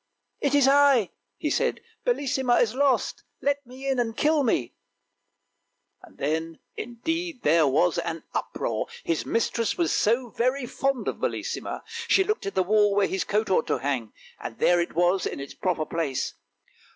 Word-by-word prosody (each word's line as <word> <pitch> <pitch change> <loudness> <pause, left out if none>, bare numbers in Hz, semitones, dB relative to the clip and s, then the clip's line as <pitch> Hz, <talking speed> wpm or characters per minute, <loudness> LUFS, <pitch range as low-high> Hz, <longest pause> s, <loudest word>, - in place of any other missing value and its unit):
" - - -49
It 285 - +1
is 280 -2 +5
I," 275 -7 +5 0.3
he - - -2
said. 480 0 +1
" - - -42
Bellissima 265 - +2
is 225 -2 +2
lost; 275 0 +1 0.2
let 285 0 0
me 260 +2 -8
in 265 -2 +1
and 225 -1 -1
kill 305 0 +3
me!" 175 - 0 1.4
Then, 160 +3 -3 0.2
indeed, 325 +5 -4
there 155 0 +4
was 165 +6 +2
an 165 -1 -4
uproar, - - -2 0.2
his 165 -2 -1
mistress 230 0 0
was 340 - +1
so 235 +3 +2
very 255 +4 0
fond 270 +1 -1
of - - -2
Bellissima; - - -3 0.2
she 385 - +5
looked 425 - -2
at 195 - -4
the 190 - +3
wall 205 +1 +3
where 200 -1 +4
his 190 - -1
coat 210 0 0
ought 170 - +2
to - - +1
hang, 130 -6 -2 0.3
and - - -7
there 175 0 +4
it 170 - -4
was, 175 +2 +2
in - - -5
its 140 0 -7
proper 170 -4 -1
place. 155 -6 -2
225 Hz, 175 wpm, -26 LUFS, 170-275 Hz, 1.4 s, is